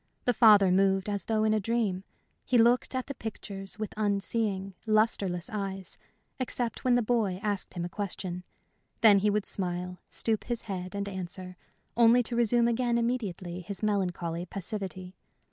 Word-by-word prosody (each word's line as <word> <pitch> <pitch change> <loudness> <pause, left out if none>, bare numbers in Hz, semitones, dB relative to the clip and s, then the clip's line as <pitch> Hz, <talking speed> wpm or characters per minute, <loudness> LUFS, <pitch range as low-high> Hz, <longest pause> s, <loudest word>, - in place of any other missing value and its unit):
The 245 - +3
father 205 -6 +7
moved 195 +1 +3
as 205 -1 -2
though 220 -1 +1
in 215 0 +3
a 215 - +2
dream. 210 -3 -1 0.4
He 250 - +2
looked 240 +3 +3
at 255 - -1
the 280 - -5
pictures 200 -4 -6
with 215 -1 -4
unseeing, 200 -1 -1
lustreless 205 -5 +1
eyes, 195 -2 -4 0.4
except 245 -2 -2
when 250 -1 +4
the 245 - +2
boy 215 -5 0
asked 205 -3 -2
him 175 -1 -2
a - - -2
question. 180 -2 -5 0.6
Then 210 -3 +7
he 210 +2 +2
would 205 -1 0
smile, 180 -1 -3
stoop 220 -2 0
his 240 -2 -2
head 185 -2 -5
and 200 0 -2
answer, 185 -1 -6 0.4
only 235 +1 +6
to 235 - -3
resume 235 0 +3
again 235 0 +1
immediately 195 -7 -2
his 195 +4 -7
melancholy 180 -4 -1
passivity. 185 -1 -5
205 Hz, 160 wpm, -29 LUFS, 185-230 Hz, 0.6 s, father